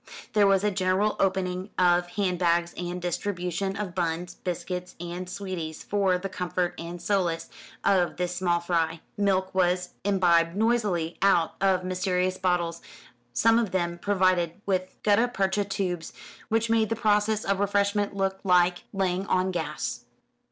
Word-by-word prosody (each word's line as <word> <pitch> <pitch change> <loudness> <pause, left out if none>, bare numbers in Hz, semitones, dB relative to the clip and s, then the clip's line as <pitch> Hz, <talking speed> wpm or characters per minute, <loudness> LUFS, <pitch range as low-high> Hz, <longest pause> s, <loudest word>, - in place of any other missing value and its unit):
There 205 -2 +5
was 195 0 +3
a 210 - +2
general 190 +2 +1
opening 185 0 0
of 175 -1 +3
hand 185 -4 0
bags 170 -1 +2
and 175 0 -4
distribution 180 +1 -2
of 200 -4 -4
buns, 175 0 -2
biscuits, 180 0 -5
and 175 +1 -5
sweeties 180 -5 -5
for 195 -3 +1
the 190 +2 -4
comfort 180 -1 -2
and 170 +1 -6
solace 170 -4 -1 0.3
of 185 -3 +2
this 180 0 -2
small 175 -2 +1
fry. 165 -1 -1
Milk 190 -2 +1
was 180 -1 +1
imbibed 175 -4 +3
noisily 205 -7 0
out 185 -4 +3
of 190 -2 +3
mysterious 185 0 0
bottles, 175 -2 0 0.5
some 230 - +4
of 230 -4 0
them 175 -2 -1
provided 185 -3 +1
with 185 -1 -1
gutta 215 +3 +4
percha 200 -3 0
tubes, 185 -4 -3 0.4
which 225 +1 +1
made 225 -1 +2
the 225 - 0
process 215 -1 +1
of 195 -1 +1
refreshment 200 0 +1
look 195 -1 -1
like 180 -2 +3
laying 190 0 -1
on 185 -1 +1
gas. 160 -4 -4
185 Hz, 150 wpm, -27 LUFS, 175-200 Hz, 0.5 s, There